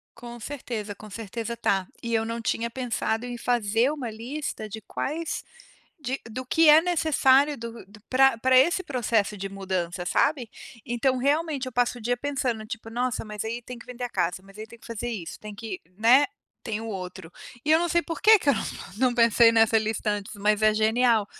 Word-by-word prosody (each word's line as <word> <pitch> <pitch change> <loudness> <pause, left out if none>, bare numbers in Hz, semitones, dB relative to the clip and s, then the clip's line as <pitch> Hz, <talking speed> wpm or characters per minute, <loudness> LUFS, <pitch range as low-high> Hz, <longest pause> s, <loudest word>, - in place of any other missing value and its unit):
Com 240 0 -10
certeza, 225 -5 -5
com 215 +1 -12
certeza 230 +3 -5
tá. 195 -4 0
E 235 0 -3
eu 225 -1 +2
não 230 +1 -3
tinha 230 +1 -1
pensado 235 -2 -2
em 245 0 -5
fazer 235 +1 +1
uma 265 -7 -4
lista 235 0 -5
de 220 - -6
quais 310 +9 -4 0.6
de 265 -2 -3
do 255 +4 -6
que 320 +4 +4
é 300 +1 +9
necessário 295 -4 +3
do 230 0 -8
do 205 +2 -16
pra 265 -1 +4
pra 260 +3 +3
esse 340 +8 +4
processo 225 - 0
de 195 0 -4
mudança, 185 -2 -3
sabe. 265 - +1 0.4
Então 250 +2 +1
realmente 285 +1 0
eu 255 - -6
passo 245 0 +1
o - - -11
dia 245 +3 0
pensando, 250 -5 -2
tipo: 225 0 -7
"Nossa, 245 +1 -2
mas 210 -2 -5
aí 230 +2 -3
tem 245 +1 -9
que - - -13
vender 250 0 -7
a 245 - -2
casa, 180 -2 -1
mas 195 +1 -16
aí 215 +1 -7
tem 235 +1 -14
que 225 - -18
fazer 235 +1 -4
isso, 200 -8 -6
tem 210 -1 -9
que" 210 -3 -6 0.2
né, 245 +6 +6 0.4
tem 220 -3 -3
o 225 - -6
outro 185 -4 -7 0.3
e 300 - +1
eu 320 - +6
não 345 - 0
sei 345 +1 +2
porque 425 +7 +5
que 310 - 0
eu - - +6
não - - -2 0.3
não 255 +1 +2
pensei 230 0 +5
nessa 225 0 +5
lista 220 0 -1
antes, 205 0 -3
mas 210 +1 +1
é 215 0 +5
genial. 220 0 +3
235 Hz, 210 wpm, -26 LUFS, 215-260 Hz, 0.6 s, é